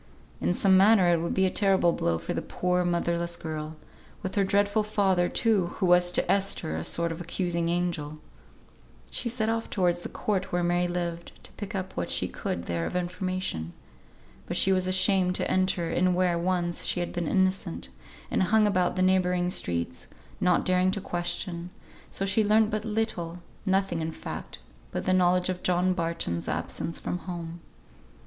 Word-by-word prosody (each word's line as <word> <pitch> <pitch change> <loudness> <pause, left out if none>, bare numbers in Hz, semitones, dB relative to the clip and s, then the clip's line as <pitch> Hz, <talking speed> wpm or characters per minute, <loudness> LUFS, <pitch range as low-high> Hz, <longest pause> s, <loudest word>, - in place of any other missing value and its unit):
In 85 +2 0
some 190 -1 +4
manner 195 -2 +6
it 170 -1 +3
would 170 - -2
be 190 - +3
a 185 - +1
terrible 190 -4 +3
blow 85 -1 0
for - - -4
the - - -2
poor, 180 0 0
motherless 170 0 -1
girl; 155 -1 -5 0.5
with 190 - -3
her 200 - +2
dreadful 205 +2 +2
father, 195 -4 +1
too, 210 -6 +2
who 195 - 0
was 180 0 +4
to - - +2
Esther 195 - +1
a 80 - -3
sort 170 - 0
of 165 +1 -6
accusing 170 -1 -1
angel. 170 -4 -2 0.9
She 235 - -3
set 225 -2 0
off 225 0 -1
towards 175 -3 +1
the - - -7
court 195 -3 -2
where 175 0 0
Mary 175 +1 +1
lived, 170 -1 -4
to - - -10
pick 205 0 -7
up 190 -1 -4
what - - -2
she - - +2
could 85 - -4
there 85 -1 -2
of - - -6
information. 180 - -3 0.7
But - - -2
she 195 - +3
was 185 -1 +2
ashamed 185 0 +3
to - - -1
enter 185 -3 +1
in 180 +1 +2
where 180 -1 +2
once 175 -1 -1
she - - 0
had 175 - -3
been 175 -2 -2
innocent, 185 - 0 0.4
and - - +1
hung 215 +4 +4
about 180 -3 +1
the 185 - +1
neighbouring 180 -1 +2
streets, 85 - -2 0.3
not 180 -1 +2
daring 185 0 +3
to 200 - -2
question, 175 -1 -3 0.4
so 195 - -2
she 205 +3 +2
learnt 215 +1 +3
but 215 +1 -2
little; 210 -6 -2 0.3
nothing 190 -3 +1
in 160 0 -2
fact - - -7 0.3
but - - -4
the 185 - +2
knowledge 180 0 +3
of 180 -1 -3
John 180 +1 +2
Barton's 165 - -2
absence 165 - -3
from 180 - -3
home. 170 -2 -6
180 Hz, 185 wpm, -27 LUFS, 170-190 Hz, 0.9 s, manner